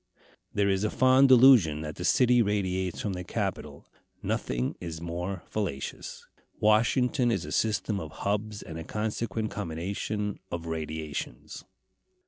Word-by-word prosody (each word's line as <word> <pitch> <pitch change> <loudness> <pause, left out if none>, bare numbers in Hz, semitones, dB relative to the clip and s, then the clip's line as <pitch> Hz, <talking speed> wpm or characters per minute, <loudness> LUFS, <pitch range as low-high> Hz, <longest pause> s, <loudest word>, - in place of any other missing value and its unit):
There 100 -1 +1
is 95 0 +1
a 110 - +1
fond 130 +3 +5
delusion 120 - +7
that 75 -1 -6
the - - -5
city 125 -1 +4
radiates 95 -4 -1
from 100 - -2
the 90 0 -5
Capitol. 85 - -4 0.4
Nothing 60 +1 -1
is 85 -2 -6
more 85 +2 -4
fallacious. 85 -11 -5 0.3
Washington 120 +4 +3
is 100 -9 -1
a 75 - -7
system 105 0 0
of 80 - -6
hubs, 105 +4 -3
and 80 0 -7
a - - -5
consequent 110 +2 -3
combination 100 +3 -3
of 85 -1 -4
radiations. 80 -5 -5
100 Hz, 135 wpm, -28 LUFS, 80-110 Hz, 0.4 s, delusion